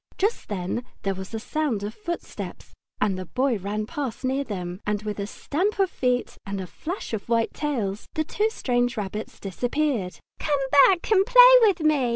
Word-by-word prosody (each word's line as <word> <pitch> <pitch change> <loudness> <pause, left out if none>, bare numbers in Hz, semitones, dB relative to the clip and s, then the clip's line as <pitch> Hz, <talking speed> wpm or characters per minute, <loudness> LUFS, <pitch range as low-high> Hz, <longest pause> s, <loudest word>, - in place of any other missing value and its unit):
Just 415 +5 0
then 195 +4 -3 0.2
there 195 - 0
was 190 0 -8
a 225 - -3
sound 255 -4 -1
of 210 +1 -4
footsteps, 345 -5 -6 0.3
and 190 -3 +1
the 185 - -6
Boy 250 - 0
ran 210 +3 -3
past 270 -2 -4
near 265 +2 0
them, 180 -5 -5
and 210 0 -1
with 210 -1 -4
a 200 - -2
stamp 365 - -2
of 390 -2 +2
feet 250 -1 -1
and 200 -1 -4
a 190 - -4
flash 325 - -6
of 220 +1 -4
white 230 -1 +1
tails 225 -10 -2
the 315 - +1
two 420 +8 0
strange 245 - 0
rabbits 210 +1 -5
disappeared. 240 - -1 0.2
"Come 295 -2 +1
back 345 +8 +5
and 385 -3 +6
play - - +9
with 400 -6 +4
me!" 300 -5 +3
245 Hz, 190 wpm, -25 LUFS, 205-310 Hz, 0.3 s, play